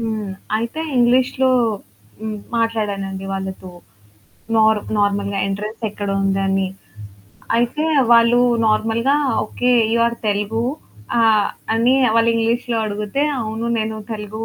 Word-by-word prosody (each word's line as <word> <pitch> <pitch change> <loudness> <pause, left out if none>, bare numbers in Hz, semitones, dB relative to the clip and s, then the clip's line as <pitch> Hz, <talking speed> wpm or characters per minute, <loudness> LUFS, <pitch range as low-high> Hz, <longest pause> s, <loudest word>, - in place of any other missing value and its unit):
హ్మ్. 220 -3 -3 0.3
అయితే 230 +8 -3 0.2
ఇంగ్లీష్‌లో 255 +2 +3 0.7
హ్మ్, 215 -1 -4 0.2
మాట్లాడానండి 200 -4 -2
వాళ్ళతో, 190 -1 -5 0.8
నారు 220 -1 +4 0.2
నార్మల్‌గా 200 -1 0
ఎంట్రన్స్ 210 +3 -5
ఎక్కడుందని. 195 -1 0 0.9
అయితే 240 +6 0 0.3
వాళ్ళు 235 +1 +5 0.3
నార్మల్‌గా 225 +5 +2 0.3
"ఓకే, 245 +3 0 0.2
యూ‌ 235 - +2
ఆర్ 235 0 -2
తెలుగు!" 210 +2 -1 0.6
ఆహ్, 220 -3 +4 0.3
అని 235 +3 +3 0.2
వాళ్ళు 230 0 +4
ఇంగ్లీష్‌లో 230 +1 0
అడుగుతే, 210 +6 -2 0.2
అవును 220 +1 -4
నేను 220 0 -2 0.2
తెలుగూ 215 +1 -6
220 Hz, 105 wpm, -19 LUFS, 205-230 Hz, 0.9 s, వాళ్ళు